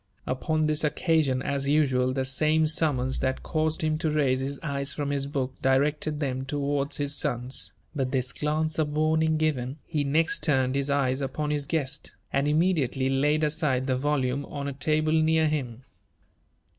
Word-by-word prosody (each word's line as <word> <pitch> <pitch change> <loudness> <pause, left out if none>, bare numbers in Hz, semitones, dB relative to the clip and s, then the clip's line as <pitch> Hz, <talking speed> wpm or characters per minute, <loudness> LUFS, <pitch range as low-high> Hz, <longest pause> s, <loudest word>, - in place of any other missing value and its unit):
Upon 155 +4 0
this 155 +1 0
occasion, 150 -3 +1
as 140 -1 -1
usual, 130 -4 +2
the 130 0 -1
same 155 +4 +2
summons 145 -5 0
that 130 0 -1
caused 155 0 -1
him 155 0 0
to 160 - 0
raise 140 -4 +2
his 135 +1 -3
eyes 140 -2 -2
from 145 -1 -2
his 140 -1 -1
book, 135 -2 -2
directed 145 +3 +1
them 130 -3 -2
towards 140 +1 -1
his 145 0 0
sons; 130 -3 -1 0.2
but 130 -3 -1
this 130 -2 -1
glance 155 +1 -1
of 155 -1 +1
warning 155 +1 +2
given, 140 -4 -1
he 150 -3 -1
next 155 +4 +1
turned 130 -4 +2
his 140 +1 -1
eyes 135 -1 +1
upon 150 +2 -2
his 145 -2 -2
guest, 145 -3 -2 0.2
and 140 +1 +2
immediately 150 -5 +1
laid 150 +3 +2
aside 150 -4 0
the 130 -1 +1
volume 140 0 0
on 140 -1 -5
a 140 - -3
table 155 +3 +1
near 160 0 +3
him. 130 -5 -3
145 Hz, 170 wpm, -27 LUFS, 130-155 Hz, 0.2 s, near